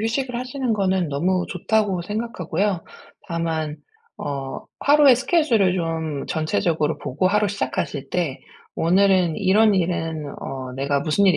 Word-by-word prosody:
휴식을 245 Hz, +3 st, -1 dB
하시는 255 Hz, -1 st, -2 dB
거는 190 Hz, -4 st, +1 dB
너무 180 Hz, +6 st, 0 dB
좋다고 195 Hz, -1 st, 0 dB
생각하고요. 205 Hz, -3 st, -2 dB, 0.4 s
다만 160 Hz, -3 st, -2 dB, 0.4 s
어 135 Hz, -2 st, -4 dB, 0.2 s
'하루에 290 Hz, -2 st, +6 dB
스케줄을 245 Hz, -, +2 dB
좀 160 Hz, -4 st, -2 dB
전체적으로 160 Hz, 0 st, 0 dB
보고 145 Hz, +6 st, -1 dB
하루 210 Hz, +2 st, +2 dB
시작하실 140 Hz, -5 st, -3 dB
때 165 Hz, -7 st, -1 dB, 0.4 s
'오늘은 185 Hz, -1 st, +3 dB
이런 210 Hz, +2 st, +4 dB
일은 165 Hz, -4 st, -1 dB
어 130 Hz, -1 st, -6 dB
내가 140 Hz, +1 st, 0 dB
무슨 170 Hz, +7 st, +2 dB
일이 185 Hz, -4 st, +5 dB
180 Hz, 300 characters per minute, -22 LUFS, 155-210 Hz, 0.4 s, 하루에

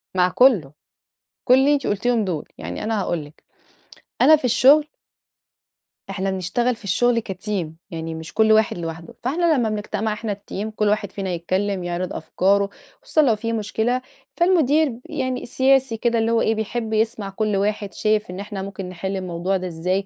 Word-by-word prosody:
مع 180 Hz, 0 st, +4 dB
كله، 195 Hz, -, +4 dB, 0.7 s
كل 250 Hz, -, +5 dB
اللي 275 Hz, +3 st, +5 dB
أنتِ 275 Hz, -, -1 dB
قُلتيهم 225 Hz, +2 st, +1 dB
دُول، 170 Hz, -6 st, -3 dB
يعني -, -, -5 dB
أنا 220 Hz, -1 st, 0 dB
هاقول 170 Hz, -5 st, -2 dB
لِك، 145 Hz, -, -17 dB, 0.8 s
أنا 315 Hz, -, +8 dB
في 295 Hz, -, -11 dB
الشغل 275 Hz, +5 st, +5 dB, 1.2 s
إحنا 195 Hz, 0 st, -2 dB
بنشتغل 235 Hz, +7 st, 0 dB
في 225 Hz, -, -19 dB
الشغل 230 Hz, +4 st, +2 dB
كteam، 190 Hz, -2 st, -3 dB, 0.2 s
يعني 165 Hz, -1 st, -5 dB
مش 160 Hz, 0 st, -8 dB
كل 220 Hz, 0 st, +4 dB
واحد 215 Hz, -4 st, +3 dB
لوحده، 165 Hz, 0 st, -6 dB
فإحنا 320 Hz, +3 st, +2 dB
لما 230 Hz, -3 st, +1 dB
بنجتمع 215 Hz, 0 st, -2 dB
إحنا 215 Hz, -1 st, -3 dB
الteam 205 Hz, +1 st, -6 dB
كل 210 Hz, -1 st, +1 dB
واحد 205 Hz, -2 st, 0 dB
فينا 195 Hz, -2 st, -4 dB
يتكلم، 185 Hz, +2 st, -1 dB
يعرض 175 Hz, +1 st, -3 dB
أفكاره، 200 Hz, +5 st, +1 dB, 0.3 s
خصوصًا 310 Hz, -, +2 dB
لو 240 Hz, -7 st, +3 dB
في 230 Hz, +2 st, -3 dB
مشكلة، 225 Hz, +3 st, -1 dB, 0.4 s
فالمدير 315 Hz, -6 st, +3 dB
يعني 260 Hz, -4 st, -3 dB
سياسي 260 Hz, -1 st, +2 dB
كده، 235 Hz, 0 st, +1 dB
اللي 225 Hz, +1 st, +1 dB
هو 230 Hz, -, +3 dB
إيه 225 Hz, -, +2 dB
بيحب 220 Hz, +1 st, -3 dB
يسمع 220 Hz, -2 st, 0 dB
كل 210 Hz, +1 st, -1 dB
واحد 205 Hz, 0 st, -1 dB
شايف 215 Hz, -2 st, 0 dB
إن 180 Hz, +2 st, -6 dB
إحنا 200 Hz, -1 st, -5 dB
ممكن 195 Hz, -1 st, -6 dB
نحل 190 Hz, +2 st, -4 dB
الموضوع 185 Hz, +1 st, -2 dB
ده 185 Hz, 0 st, -4 dB
إزاي، 180 Hz, +4 st, -1 dB
210 Hz, 175 wpm, -22 LUFS, 190-240 Hz, 1.2 s, أنا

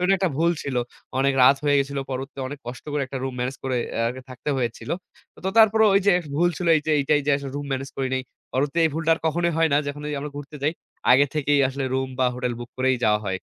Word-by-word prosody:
ওটা 180 Hz, +2 st, +3 dB
একটা 185 Hz, -1 st, +1 dB
ভুল 165 Hz, +3 st, +3 dB
ছিল। 135 Hz, -3 st, -3 dB, 0.4 s
অনেক 140 Hz, +1 st, +3 dB
রাত 135 Hz, +2 st, +7 dB
হয়ে 145 Hz, -1 st, +4 dB
গেছিল। 140 Hz, 0 st, -3 dB
পরবর্তীতে 135 Hz, +1 st, -5 dB
অনেক 145 Hz, +1 st, -7 dB
কষ্ট 125 Hz, +1 st, -7 dB
করে, 145 Hz, -1 st, 0 dB
একটা 135 Hz, 0 st, -5 dB
রুম 130 Hz, -1 st, -3 dB
ম্যানেজ 125 Hz, +2 st, -2 dB
করে 130 Hz, -1 st, 0 dB, 0.2 s
অ্যা 115 Hz, -, -1 dB
আরকি 130 Hz, +2 st, -6 dB
থাকতে 130 Hz, +3 st, -7 dB
হয়েছিল। 115 Hz, -2 st, -3 dB, 0.5 s
তো -, -, +1 dB
তারপরেও 220 Hz, 0 st, +6 dB
ওই 200 Hz, -, +5 dB
যে, -, -, +7 dB
এ -, -, -3 dB, 0.2 s
ভুল 175 Hz, +3 st, +4 dB
ছিল 180 Hz, -, -3 dB
এই 155 Hz, -, -1 dB
যে, 155 Hz, -, +1 dB
এইটাই 145 Hz, +1 st, +2 dB
যে 145 Hz, -, +3 dB
আসলে 140 Hz, -1 st, -6 dB
রুম 145 Hz, -, -4 dB
মেনেজ 135 Hz, +1 st, -3 dB
করি 135 Hz, -1 st, -1 dB
নাই। 130 Hz, -, -1 dB, 0.3 s
পরবর্তীতে 145 Hz, +5 st, 0 dB
এই 160 Hz, -, +3 dB
ভুলটা 165 Hz, 0 st, 0 dB
আর -, -, -11 dB
কখনোই 170 Hz, +2 st, +1 dB
হয় 165 Hz, 0 st, +4 dB
না, 145 Hz, -, +5 dB
যখন 145 Hz, +1 st, -5 dB
এই -, -, -3 dB
যে -, -, -2 dB
আমরা 150 Hz, +1 st, -5 dB
ঘুরতে 145 Hz, +1 st, -8 dB
যাই, 150 Hz, -, +2 dB, 0.4 s
আগে 140 Hz, +3 st, +6 dB
থেকেই 145 Hz, -1 st, +2 dB
আসলে 135 Hz, 0 st, -3 dB
রুম 130 Hz, 0 st, 0 dB
বা 130 Hz, -, +3 dB
হোটেল 125 Hz, -1 st, -2 dB
বুক 120 Hz, 0 st, -8 dB
করেই 130 Hz, 0 st, +2 dB
যাওয়া 105 Hz, -1 st, +3 dB
হয়। 95 Hz, -1 st, -1 dB
140 Hz, 265 wpm, -24 LUFS, 130-150 Hz, 0.5 s, রাত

